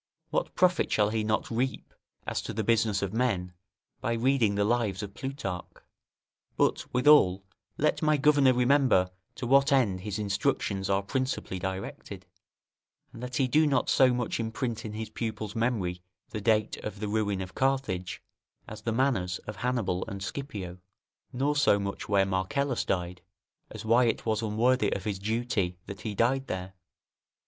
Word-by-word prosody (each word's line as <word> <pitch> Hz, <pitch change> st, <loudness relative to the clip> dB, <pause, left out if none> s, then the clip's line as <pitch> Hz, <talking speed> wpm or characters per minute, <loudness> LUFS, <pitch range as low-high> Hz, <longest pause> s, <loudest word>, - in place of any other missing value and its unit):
What -, -, -1 dB
profit 180 Hz, 0 st, +3 dB
shall 105 Hz, -1 st, +3 dB
he 110 Hz, -1 st, 0 dB
not 105 Hz, +2 st, -1 dB
reap 125 Hz, +3 st, -2 dB, 0.3 s
as -, -, -2 dB
to -, -, -6 dB
the 110 Hz, -, -2 dB
business 110 Hz, -2 st, +2 dB
of 100 Hz, 0 st, -3 dB
men, 100 Hz, -7 st, 0 dB, 0.5 s
by 115 Hz, -, -1 dB
reading 115 Hz, -3 st, +2 dB
the 100 Hz, -, +2 dB
Lives 110 Hz, -3 st, 0 dB
of 100 Hz, -1 st, -7 dB
Plutarch? 130 Hz, -10 st, -5 dB, 0.9 s
But, -, -, +1 dB
withal, 125 Hz, -9 st, +5 dB, 0.3 s
let 155 Hz, +1 st, +1 dB
my 155 Hz, -1 st, +3 dB
governor 145 Hz, -2 st, +5 dB
remember 125 Hz, -7 st, +3 dB, 0.2 s
to -, -, -5 dB
what 140 Hz, +3 st, +4 dB
end 115 Hz, -9 st, +3 dB
his 105 Hz, +1 st, -4 dB
instructions 100 Hz, -2 st, -1 dB
are 100 Hz, 0 st, +2 dB
principally 130 Hz, -4 st, -2 dB
directed, 95 Hz, +1 st, -6 dB, 0.9 s
and 115 Hz, -, -10 dB
that 125 Hz, 0 st, -5 dB
he 135 Hz, -, +2 dB
do 155 Hz, +4 st, +4 dB
not 140 Hz, -, +1 dB
so 130 Hz, -3 st, +5 dB
much 120 Hz, -2 st, -2 dB
imprint 115 Hz, +1 st, -3 dB
in 105 Hz, -, -5 dB
his 110 Hz, +1 st, -5 dB
pupil's 110 Hz, -2 st, -4 dB
memory 105 Hz, -7 st, -1 dB, 0.3 s
the 105 Hz, -, -4 dB
date 110 Hz, 0 st, +2 dB
of 105 Hz, -2 st, -7 dB
the 105 Hz, -, -3 dB
ruin 105 Hz, -2 st, 0 dB
of 95 Hz, -1 st, -6 dB
Carthage, 130 Hz, -10 st, -1 dB, 0.4 s
as 110 Hz, 0 st, -8 dB
the 115 Hz, -, -2 dB
manners 110 Hz, -7 st, +1 dB
of 105 Hz, -, -7 dB
Hannibal 115 Hz, -8 st, -1 dB
and 100 Hz, 0 st, -6 dB
Scipio; 100 Hz, -8 st, -6 dB, 0.5 s
nor 140 Hz, +4 st, 0 dB
so 145 Hz, -8 st, +4 dB
much 100 Hz, 0 st, -4 dB
where 100 Hz, -2 st, +4 dB
Marcellus 105 Hz, +8 st, -1 dB
died, 90 Hz, -1 st, -2 dB, 0.5 s
as 110 Hz, 0 st, -8 dB
why 120 Hz, +3 st, +4 dB
it 115 Hz, -, -1 dB
was 110 Hz, -1 st, 0 dB
unworthy 115 Hz, +1 st, +2 dB
of 100 Hz, -, -4 dB
his 100 Hz, -3 st, -3 dB
duty 105 Hz, -4 st, -1 dB
that 100 Hz, -, -8 dB
he 105 Hz, -2 st, -4 dB
died 130 Hz, +5 st, +1 dB
there. 95 Hz, +1 st, -5 dB
110 Hz, 165 wpm, -28 LUFS, 100-130 Hz, 0.9 s, withal